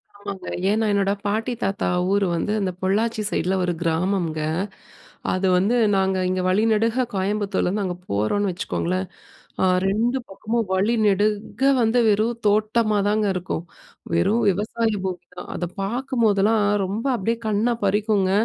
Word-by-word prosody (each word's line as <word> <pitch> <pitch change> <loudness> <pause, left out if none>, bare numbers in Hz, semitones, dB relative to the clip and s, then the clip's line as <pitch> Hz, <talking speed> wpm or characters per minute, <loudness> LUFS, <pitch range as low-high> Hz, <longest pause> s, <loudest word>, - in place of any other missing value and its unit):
ஆமாங்க. 200 -2 -7 0.2
ஏன்னா 220 +1 +2
என்னோட 200 -1 +2
பாட்டி, 220 +4 -1
தாத்தா 195 0 -1 0.2
ஊர் 200 -1 +2
வந்து 210 +5 -1
அந்த 185 -2 0
பொள்ளாச்சி 215 +4 0
சைட்ல 185 +1 0
ஒரு 175 -1 0
கிராமம்ங்க. 165 -1 0 0.9
அது 185 +1 0
வந்து 205 +7 +2 0.2
நாங்க 190 0 +1
இங்க 185 0 0
வழி 205 +4 +2
நெடுக 230 +4 +2
கோயம்புத்தூர்லருந்து 200 0 0
அங்க 180 -1 -3 0.2
போறோன்னு 185 - +1
வச்சுக்கோங்களேன். 185 +1 -2 0.6
அ - - +4 0.2
2 230 +6 +1
பக்கமும் 220 +3 -2
வழி 205 +5 +2
நெடுக 210 +5 0 0.2
வந்து 230 +2 +3
வெறும் 220 +3 +1
தோட்டமா 215 0 +2
தாங்க 210 0 +1
இருக்கும். 180 -2 -3 0.5
வெறும் 215 - +2
விவசாய 220 +3 -1
பூமி 180 -2 -4
தான். - - -8
அத 175 - -3 0.2
பார்க்கும் 245 +3 -1
போதெல்லாம், 210 +1 +3 0.2
ரொம்ப 215 +7 -3
அப்பிடியே 230 +3 -1
கண்ண 215 +3 +1 0.2
பறிக்குங்க. 205 -1 +2
205 Hz, 140 wpm, -23 LUFS, 190-220 Hz, 0.9 s, அ